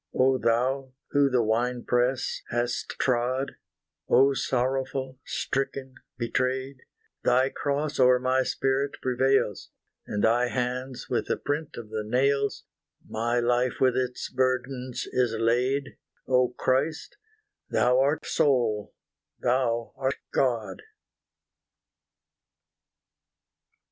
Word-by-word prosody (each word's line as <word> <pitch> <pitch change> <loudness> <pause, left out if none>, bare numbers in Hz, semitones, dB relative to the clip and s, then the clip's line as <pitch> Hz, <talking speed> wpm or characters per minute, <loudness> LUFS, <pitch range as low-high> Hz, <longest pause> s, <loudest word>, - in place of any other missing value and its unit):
O 130 0 +3
Thou, 130 +3 0 0.2
who 140 -1 +4
the 125 -2 +2
wine 120 +3 0
press 125 +1 0
hast 120 0 -2
trod, 130 +2 0 0.6
O 135 +1 +5
sorrowful 130 0 -1
stricken 135 -1 -3 0.2
betrayed, 130 +3 -1 0.5
Thy 130 +2 +3
cross 145 +1 -2
o'er 125 -1 +6
my 130 +1 +1
spirit 135 +2 0
prevails; 130 -4 +1 0.4
In 105 - -2
Thy 120 +3 +3
hands 125 +1 -3
with - - -1
the - - 0
print 145 +1 -3
of 115 -2 -8
the 110 -1 -2
nails, 140 +5 +1 0.4
My 120 +2 0
life 120 +1 +1
with 130 -2 +3
its 125 -1 -2
burdens 130 0 -1
is 125 -3 +1
laid, 125 +4 0 0.3
O 125 -1 +4
Christ 135 +5 -1 0.5
Thou 125 +1 +3
art 140 +3 +1
sole 120 -7 +1 0.4
Thou 120 -2 0
art 135 0 -1 0.2
God! 115 -8 0
130 Hz, 105 wpm, -27 LUFS, 120-135 Hz, 0.6 s, o'er